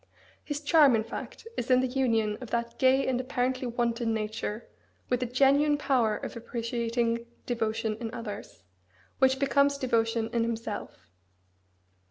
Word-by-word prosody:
His 290 -1 -4
charm, 295 -4 +6
in 220 - +1
fact, 230 - -8
is 240 - -3
in 255 -1 +6
the - - +1
union 230 -5 +1
of 250 - -7
that 235 0 -3
gay 265 +1 +4
and 255 -1 0
apparently 255 0 -1
wanton 235 -1 0
nature 215 0 -4 0.4
with 250 0 +1
a 250 - 0
genuine 280 +4 +4
power 245 -7 +1
of - - -7
appreciating 235 0 -2 0.2
devotion 220 -2 -1
in 225 -2 -4
others, 215 - -7 0.6
which 265 0 +4
becomes 280 +1 +3
devotion 230 -3 0
in 235 - +2
himself. 220 - -4
235 Hz, 145 wpm, -28 LUFS, 225-260 Hz, 0.6 s, charm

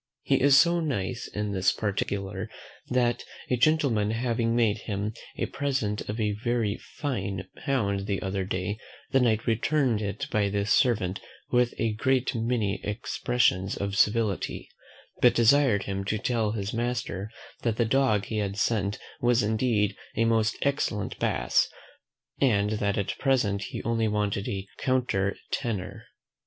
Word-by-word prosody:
He - - +2
is 140 0 +7
so 170 +3 +5
nice 125 - -2
in 105 0 -3
this 95 -1 +2
particular, 100 -2 -3 0.4
that 120 -1 +1 0.3
a - - +4
gentleman 125 -6 +2
having 115 0 0
made 115 -3 +2
him 105 0 -3 0.2
a - - 0
present 130 -9 -2
of 105 +2 -3
a 105 -1 +1
very 115 -4 0 0.2
fine 100 -9 -3 0.2
hound 100 -7 0
the 100 -1 0
other 95 0 -2
day, 95 +3 -3 0.3
the 135 - +4
Knight 110 -4 +2
returned 120 0 +1
it 100 -1 -3
by 105 -2 +2
the 100 0 -1
servant 100 -5 +2 0.3
with 125 -1 +2
a 115 -1 0
great 130 +4 +1
many 115 -4 -1
expressions 105 -2 0
of 100 0 -2
civility; 105 -1 +1 0.5
but 125 - +6
desired 120 -3 +4
him 100 0 -3
to 105 +2 0
tell 110 -1 0
his 100 -2 -3
master, 115 -4 -2 0.3
that 115 -2 0
the 115 - +3
dog 110 -4 +2
he 110 - -3
had 100 -1 -2
sent 105 -2 0 0.2
was 120 -1 +3
indeed 110 -2 +1 0.2
a 115 - +2
most 115 -1 +2
excellent 140 -7 -1
BASS, - - +2 0.7
but 105 -5 +2
that 100 +1 0
at 100 - -2
present 110 -8 +1
he - - -6
only 115 -1 +1
wanted 105 -1 -1
a 95 -1 -3
COUNTER 120 -7 +1 0.2
TENOR. 105 -6 -3
110 Hz, 150 wpm, -27 LUFS, 100-120 Hz, 0.7 s, is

